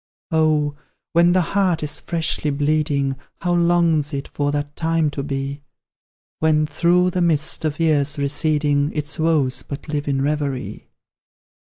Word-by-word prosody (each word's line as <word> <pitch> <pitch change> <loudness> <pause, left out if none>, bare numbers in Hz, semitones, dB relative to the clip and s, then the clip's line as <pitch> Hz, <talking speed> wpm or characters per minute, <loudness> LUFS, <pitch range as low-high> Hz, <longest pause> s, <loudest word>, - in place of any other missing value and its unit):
Oh! 155 -2 +2 0.4
when 170 +1 +5
the 185 - +4
heart 185 -5 +2
is 150 - -3
freshly 160 -2 -1
bleeding, 145 -1 0 0.2
How 175 -1 0
longs 170 -4 +2
it 140 - -4
for 145 0 -1
that 145 0 -3
time 160 -2 +1
to 145 - -4
be, 140 0 -4 0.8
When, 155 -1 +3
through 175 +4 +2
the 180 - -1
mist 160 -2 +1
of 155 0 -2
years 150 -3 +2
receding, 145 0 +1
Its 150 +2 -3
woes 155 -5 +1
but 140 +2 -8
live 150 -1 -2
in 135 -1 0
reverie! 145 -3 -3
150 Hz, 145 wpm, -21 LUFS, 145-165 Hz, 0.8 s, when